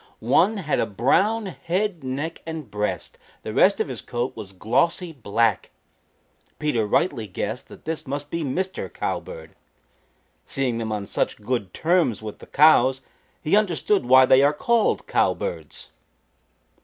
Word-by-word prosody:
One 210 +6 +4
had 160 -6 -1
a - - +1
brown 190 - +2
head, 175 +2 -2
neck 140 +6 -4
and 160 -8 -6
breast; 105 -4 -3 0.2
the - - -5
rest - - +4
of - - 0
his - - -6
coat 120 +2 -3
was 105 -4 -8
glossy 150 - 0
black. 115 - 0 0.9
Peter 120 -8 0
rightly 115 - +1
guessed 105 +5 -4
that - - -14
this 160 -2 -4
must 145 +2 -4
be 170 - -2
Mr. 185 +7 -3
Cowbird. - - -5 0.9
Seeing 130 -4 -1
them 110 -1 -3
on 105 -2 -3
such - - -1
good 105 -3 -2
terms 165 - +1
with 110 -1 -8
the - - -13
cows 135 -3 +5 0.4
he 160 +4 +3
understood 195 - +1
why 130 +1 +8
they 130 +1 +6
are 145 +2 +4
called 230 +8 +1
Cowbirds. - - -2
135 Hz, 145 wpm, -24 LUFS, 115-170 Hz, 0.9 s, why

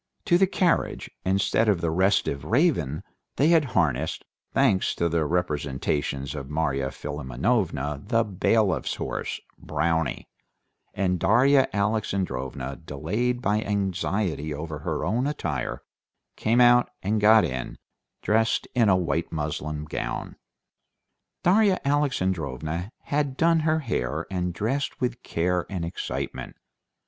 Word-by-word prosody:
To 175 -3 +4
the 190 - +5
carriage, 180 -2 0
instead 100 +4 +2
of 100 -4 +2
the 85 -1 -1
restive 95 -5 +1
Raven, 110 - +1 0.3
they 145 +4 +3
had 165 -2 +5
harnessed, 75 -9 0 0.3
thanks 95 - +2
to 85 - +1
the 80 -2 0
representations 70 -4 -1
of 70 -3 -6
Marya 70 -3 0
Philimonovna, 75 - -2
the 115 -2 +3
bailiff's 100 - +1
horse, - - -4 0.2
Brownie, 80 -5 -1 0.7
and 90 -2 0
Darya 135 +7 +4
Alexandrovna, 90 - -2
delayed 105 - -2
by 105 +2 +2
anxiety 95 -5 -1
over 75 +1 -5
her - - -2
own 125 +5 0
attire, 150 0 -3 0.5
came 115 +3 +1
out 120 0 +6
and 105 +2 0
got 110 +1 +6
in, 65 -1 -4 0.5
dressed 110 +1 +2
in 115 -4 +4
a 95 - +5
white 80 -2 -1
muslin 75 -1 -3
gown. 75 - -4 1.1
Darya 195 +1 +4
Alexandrovna 95 - -1
had 145 -2 -1
done 165 0 +4
her 155 0 +1
hair, 80 - -2
and 90 -1 -1
dressed 115 +11 -2
with 125 -1 -2
care 90 +1 -1
and 90 -4 -3
excitement. 85 - -5
95 Hz, 120 wpm, -25 LUFS, 75-120 Hz, 1.1 s, out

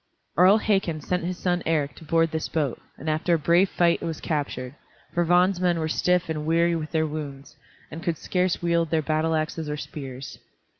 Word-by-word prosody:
Earl 185 +6 +6
Hakon 195 -7 0
sent 180 +3 -2
his 180 0 -3
son 175 -1 0
Eric 150 -3 0
to - - -12
board 165 +1 +2
this 160 0 -3
boat, 145 -6 -1 0.2
and 155 - -9
after 155 +3 +2
a - - +2
brave 170 +5 +3
fight 170 -1 +2
it - - -4
was 165 -2 -4
captured, 140 -5 -3 0.4
for 175 - +2
Vagn's 175 +2 +3
men 180 -2 +2
were 160 -1 -1
stiff 180 +2 +1
and 155 -1 -3
weary 170 +1 +3
with 155 -2 -4
their 160 -1 +1
wounds, 145 -3 -6 0.4
and 160 - -7
could 170 -2 -1
scarce 180 0 -1
wield 170 -1 +2
their 160 -1 +1
battle 155 +2 +1
axes 155 0 -2
or 150 - -2
spears. 135 -3 -7
165 Hz, 205 wpm, -25 LUFS, 155-175 Hz, 0.4 s, Earl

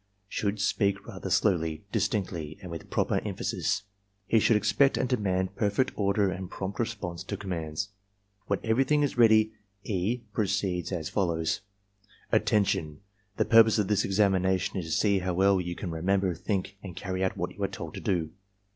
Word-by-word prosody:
should 105 0 -2
speak 100 0 +1
rather - - -6
slowly, 80 -3 +1
distinctly, 95 -7 -1
and 90 - -7
with 85 - -7
proper - - +1
emphasis. - - -1 0.4
He 115 - +3
shovM 110 - +4
expect 110 +7 +3
and - - +1
demand 95 -6 0
per 105 - +1
fect 130 +6 +1
order 100 -1 +2
and 95 -1 -5
prompt 95 0 -5
response 100 -7 -3
to 100 - -4
commands. 85 -2 -3
J 100 - -25 0.6
When - - 0
everything 135 +6 +2
is 145 - 0
ready 110 -1 +5 0.3
E. 105 +4 -1
proceeds 100 -4 -1
as 80 -4 -3
follows: 85 -5 0 0.7
"Attention! 95 -7 +1 0.4
The - - +2
purpose 115 -1 +6
of 105 -2 +1
this 105 -1 +3
examination 95 -1 +2
is 90 - -4
to 80 - -6
see 100 -2 +3
how 90 -1 -2
well 95 0 +4
you 90 0 -4
can 90 -1 -5
remember, 95 +3 +1
think, 95 +2 -3
and 95 -5 -8
carry 95 0 -3
out 95 - -1
what - - -3
you - - -10
are - - +2
told - - -7
to - - -6
do. 85 -5 0
95 Hz, 175 wpm, -28 LUFS, 90-105 Hz, 0.7 s, purpose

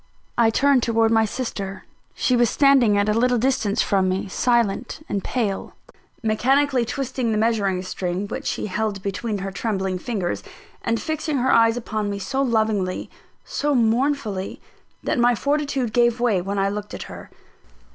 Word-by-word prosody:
I 230 -1 +4
turned 275 +3 +3
towards 225 -1 +2
my 225 0 +4
sister. 200 -5 -5 0.3
She 255 - +2
was 240 -2 +3
standing 270 -7 +4
at 205 +1 +2
a 210 - +3
little 245 +2 +2
distance 225 -4 +1
from 190 -2 +2
me, 190 +2 -1
silent 240 +6 0
and 200 -2 -2
pale, 210 -6 -2 0.5
mechanically 260 +4 +2
twisting 255 -1 -2
the 215 - +1
measuring 205 -5 +1
string, 185 +1 -3
which - - -5
she - - -2
still 205 -1 -4
held 210 -3 -2
between 205 +2 -2
her 195 - -4
trembling 190 -3 -2
fingers; 195 -5 -2 0.4
and 230 0 0
fixing 310 -2 -2
her 260 +1 +2
eyes 230 0 +4
upon 215 -3 -3
me 200 - -3
so 265 +8 -2
lovingly, 220 -7 0 0.3
so 290 0 -1
mournfully, 230 -4 0 0.4
that - - 0
my 240 0 +4
fortitude 280 -3 -1
gave 240 -1 +3
way 225 -7 +2
when 200 +3 -3
I 195 0 +2
looked 205 +1 -4
at - - -6
her. - - -10
225 Hz, 165 wpm, -23 LUFS, 200-250 Hz, 0.5 s, I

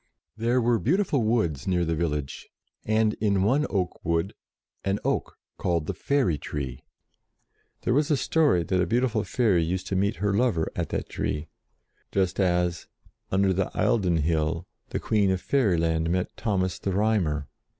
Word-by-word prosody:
There 120 +3 +1
were 120 -1 +2
beautiful 155 - +1
woods 110 - 0
near 90 -2 +2
the 80 - 0
village, 75 -4 -3 0.4
and 110 0 +2
in 100 -3 +2
one 135 +9 +2
oak 95 -4 -2
wood 85 +2 0 0.5
an 100 +1 0
oak - - -1 0.2
called 85 -3 0
the - - -2
Fairy 115 - +1
Tree. 65 -4 -5 1.0
There 120 - +1
was 145 +2 +2
a 150 - +3
story 145 - +2
that 90 +2 +1
a 90 - +1
beautiful 115 0 +1
fairy 100 -4 +2
used 90 +3 -2
to 95 - -1
meet 100 +4 +1
her 100 0 0
lover 100 -7 +1
at - - -2
that - - -3
tree, 75 +2 -3 0.6
just 95 -1 0
as, 90 -2 +1 0.4
under 95 0 +3
the 95 0 0
Eildon 90 -7 +2
Hill, 80 +1 0 0.2
the - - -2
Queen 105 -3 +2
of 95 -1 +1
Fairyland 85 -10 +1
met 90 +1 -1
Thomas 95 -5 -1
the 95 - -2
Rhymer. 90 -9 +1
95 Hz, 160 wpm, -26 LUFS, 85-110 Hz, 1.0 s, a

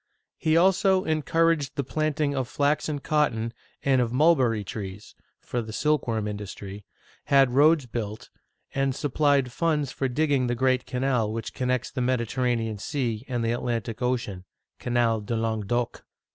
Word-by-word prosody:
He 160 +1 +3
also 190 +1 +4
encouraged 160 -1 +1
the 140 - -1
planting 155 +1 -1
of 130 -3 -1
flax 145 +4 0
and 145 -2 -3
cotton, 115 -7 +1 0.3
and 135 -2 +3
of 120 -2 0
mul 155 +7 +5
berry 115 -6 +1
trees 100 0 -7 0.3
(for 120 - -3
the 110 -1 -7
silkworm 115 -5 0
industry), 100 -1 -7 0.4
had 135 -3 +4
roads 150 +1 +5
built, 110 -3 -5 0.4
and 135 -1 0
supplied 145 -2 +1
funds 150 0 0
for 135 - -1
digging 140 -1 +1
the 120 - 0
great 130 0 +1
canal 125 -4 0
which 115 +1 -5
con 125 - -2
nects 125 -1 -1
the 130 - -2
Mediterranean 120 -3 0
Sea 120 -4 -2
and 120 -3 -1
the 115 - +1
Atlantic 120 -1 -3
Ocean 120 -7 -2 0.3
(Canal 120 -2 +1
du 110 +3 -3
Languedoc). 115 +1 -1
125 Hz, 155 wpm, -26 LUFS, 115-145 Hz, 0.4 s, mul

